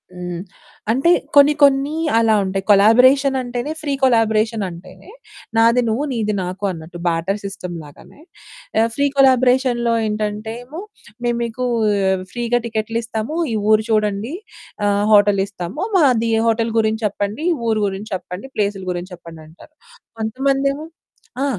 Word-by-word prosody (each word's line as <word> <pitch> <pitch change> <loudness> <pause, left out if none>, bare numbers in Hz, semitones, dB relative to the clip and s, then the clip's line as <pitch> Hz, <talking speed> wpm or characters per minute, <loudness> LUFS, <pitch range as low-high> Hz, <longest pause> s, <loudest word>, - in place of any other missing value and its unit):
హ్మ్. 180 -1 -5 0.5
అంటే 270 +8 +2 0.3
కొన్ని 285 +1 +7
కొన్ని 280 +2 +3 0.2
అలా 225 -1 +3
ఉంటాయి. 190 0 -3
కొలాబరేషన్ 255 +7 +5
అంటేనే 245 +4 -4
ఫ్రీ 285 -2 -2
కొలాబరేషన్ 225 -3 +2
అంటేనే 175 - -13 0.5
"నాది 230 +2 +4
నువ్వు, 240 +7 -1
నీది 215 -2 -1
నాకు" 185 +3 -6
అన్నట్టు 165 0 -9
బార్టర్ 170 +4 -1
సిస్టమ్ 185 -3 -6
లాగానే. 145 - -16 0.6
ఆహ్, 225 +1 +3
ఫ్రీ 285 - +2
కొలాబరేషన్‌లో 255 -2 +3
ఏంటంటేము, 215 +6 -4 0.5
"మేము 240 0 0
మీకు 235 +2 -3 0.7
ఫ్రీగా 240 0 0
టికెట్లు 225 0 -3
ఇస్తాము, 225 +6 -4 0.2
ఈ - - 0 0.2
ఊరు 215 0 +4
చూడండి, 215 +3 0 0.5
ఆహ్, 205 0 +1
హోటల్ 205 -1 +5
ఇస్తాము. 195 - -6 0.2
మా 340 - +4 0.4
హోటల్ 230 0 +1
గురించి 220 0 0
చెప్పండి, 205 - -4 0.2
ఊరు 220 -1 +1
గురించి 195 +2 -6
చెప్పండి, 180 +4 -7
ప్లేసుల 200 -2 -1
గురించి 180 +1 -6
చెప్పండి" 165 -2 -13
అంటారు. 170 - -18 0.5
కొంతమందేమో 275 +6 -1 0.6
ఆ! 280 - +1
220 Hz, 130 wpm, -19 LUFS, 200-255 Hz, 0.7 s, కొన్ని